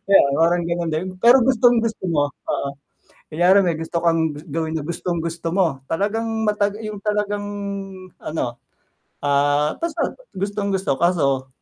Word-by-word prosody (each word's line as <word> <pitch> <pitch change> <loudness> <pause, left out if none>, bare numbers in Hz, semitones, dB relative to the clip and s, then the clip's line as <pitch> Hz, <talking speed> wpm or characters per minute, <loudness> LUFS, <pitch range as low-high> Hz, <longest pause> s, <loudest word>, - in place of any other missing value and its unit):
Kaya 200 0 +7 0.2
parang 175 +2 +3
ganun 170 -1 -1
din, 160 +3 -1
pero 240 +5 +6
gustong-gusto 235 -4 +2
mo, 145 -2 +1
oo. 140 +1 -4 0.6
Kunyari 180 +5 +5
may 170 -3 0
gusto 165 +1 -3
kang 165 -2 +2 0.2
gawin 160 +1 -2
na - - -3
gustong-gusto 170 -1 -3
mo 190 -3 +3 0.2
talagang 205 +6 0 0.2
matag 210 0 0
yung 215 -1 -5
talagang 205 -1 -1 0.8
ano, 125 -6 -3 0.7
ah, 145 +1 +2
basta 335 -1 -2 0.2
gustong 200 +1 -2
gusto 190 -8 0
kaso 140 -7 +2
175 Hz, 135 wpm, -21 LUFS, 160-205 Hz, 0.8 s, Kaya